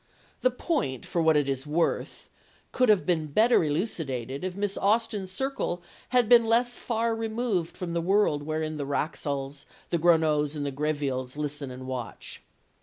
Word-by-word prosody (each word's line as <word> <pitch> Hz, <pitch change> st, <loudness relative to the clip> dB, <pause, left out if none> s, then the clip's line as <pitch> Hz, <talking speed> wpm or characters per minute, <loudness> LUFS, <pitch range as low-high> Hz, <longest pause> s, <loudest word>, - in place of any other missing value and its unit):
The 255 Hz, -, +3 dB
point, 250 Hz, -, -2 dB
for 170 Hz, -, -1 dB
what 160 Hz, -1 st, +4 dB
it 145 Hz, -2 st, +1 dB
is 135 Hz, +1 st, -2 dB
worth, 165 Hz, +3 st, -1 dB, 0.4 s
could 255 Hz, -2 st, +2 dB
have 205 Hz, -3 st, +4 dB
been 165 Hz, -4 st, +1 dB
better 220 Hz, +8 st, +4 dB
elucidated 145 Hz, -, -2 dB
if 185 Hz, -1 st, -3 dB
Miss 200 Hz, 0 st, -1 dB
Austen's 205 Hz, -2 st, +1 dB
circle 190 Hz, -6 st, -2 dB, 0.3 s
had 250 Hz, -3 st, +3 dB
been 235 Hz, -1 st, +6 dB
less 240 Hz, +2 st, +2 dB
far 230 Hz, -1 st, -1 dB
removed 225 Hz, -6 st, -2 dB
from 175 Hz, -2 st, -4 dB
the 170 Hz, -, 0 dB
world 190 Hz, -4 st, +2 dB
wherein 155 Hz, +1 st, -3 dB
the 145 Hz, -, -3 dB
Wraxalls, 140 Hz, -1 st, -3 dB, 0.2 s
the 170 Hz, -, +1 dB
Gronows 155 Hz, -3 st, +3 dB
and 145 Hz, -1 st, -3 dB
the 140 Hz, -, -2 dB
Grevilles 140 Hz, -2 st, -2 dB
listen 150 Hz, -2 st, -3 dB
and 130 Hz, 0 st, -8 dB
watch. 125 Hz, -4 st, -6 dB
165 Hz, 165 wpm, -27 LUFS, 145-215 Hz, 0.4 s, been